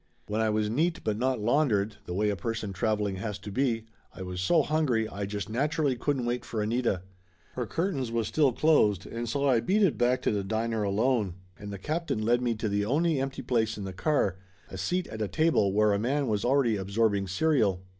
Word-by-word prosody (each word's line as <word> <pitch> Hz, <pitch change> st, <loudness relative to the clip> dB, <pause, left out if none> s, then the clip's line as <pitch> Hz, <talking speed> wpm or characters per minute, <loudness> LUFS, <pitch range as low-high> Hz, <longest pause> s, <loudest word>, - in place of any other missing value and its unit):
When 110 Hz, +2 st, -1 dB
I 110 Hz, -, +2 dB
was 105 Hz, 0 st, +1 dB
neat 160 Hz, +10 st, 0 dB
but 110 Hz, -1 st, 0 dB
not 130 Hz, +2 st, 0 dB
laundered, 110 Hz, -4 st, +1 dB
the 90 Hz, -, -5 dB
way 105 Hz, +2 st, +1 dB
a -, -, -2 dB
per 115 Hz, +5 st, -3 dB
son 105 Hz, -3 st, -4 dB
traveling 105 Hz, -1 st, 0 dB
has 105 Hz, 0 st, -4 dB
to 100 Hz, +1 st, -9 dB
be, 115 Hz, -1 st, 0 dB, 0.3 s
I 95 Hz, -, -6 dB
was 90 Hz, -1 st, -5 dB
so 155 Hz, -, +3 dB
hungry 140 Hz, -8 st, +1 dB
I 100 Hz, -2 st, -5 dB
just 100 Hz, -1 st, -4 dB
nat 130 Hz, +7 st, 0 dB
urally 145 Hz, -7 st, 0 dB
couldn't 135 Hz, -4 st, 0 dB
wait 120 Hz, 0 st, -1 dB
for 115 Hz, -, -4 dB
Anita. 115 Hz, -4 st, 0 dB, 0.5 s
Her 125 Hz, -3 st, -3 dB
curtains 160 Hz, -, -2 dB
was 115 Hz, -2 st, 0 dB
still 145 Hz, -4 st, +3 dB
closed, 110 Hz, -, +3 dB
and 115 Hz, 0 st, -5 dB
so 140 Hz, +3 st, 0 dB
I 125 Hz, -4 st, +4 dB
beat 200 Hz, -, +2 dB
it 185 Hz, -, +2 dB
back 125 Hz, +1 st, +2 dB
to -, -, +2 dB
the 100 Hz, -2 st, -1 dB
diner 110 Hz, +2 st, -1 dB
alone, 105 Hz, -1 st, +1 dB, 0.2 s
and 105 Hz, -1 st, -7 dB
the 100 Hz, -, -5 dB
captain 155 Hz, -, -2 dB
led 120 Hz, +2 st, +2 dB
me 120 Hz, -2 st, 0 dB
to 110 Hz, +1 st, -3 dB
the 100 Hz, 0 st, 0 dB
only 150 Hz, +6 st, +1 dB
empty 135 Hz, 0 st, -3 dB
place 115 Hz, -3 st, 0 dB
in 105 Hz, -, -5 dB
the 95 Hz, -1 st, -5 dB
car 95 Hz, -, 0 dB, 0.3 s
a 95 Hz, -, -6 dB
seat 180 Hz, -, -1 dB
at 110 Hz, -, -6 dB
a 105 Hz, -, 0 dB
table 155 Hz, -8 st, +2 dB
where 105 Hz, +1 st, +3 dB
a 100 Hz, -, +1 dB
man 135 Hz, +6 st, 0 dB
was 105 Hz, -3 st, 0 dB
already 125 Hz, -4 st, +2 dB
absorbing 100 Hz, 0 st, 0 dB
cereal. 100 Hz, -, +1 dB
115 Hz, 225 wpm, -28 LUFS, 105-135 Hz, 0.5 s, I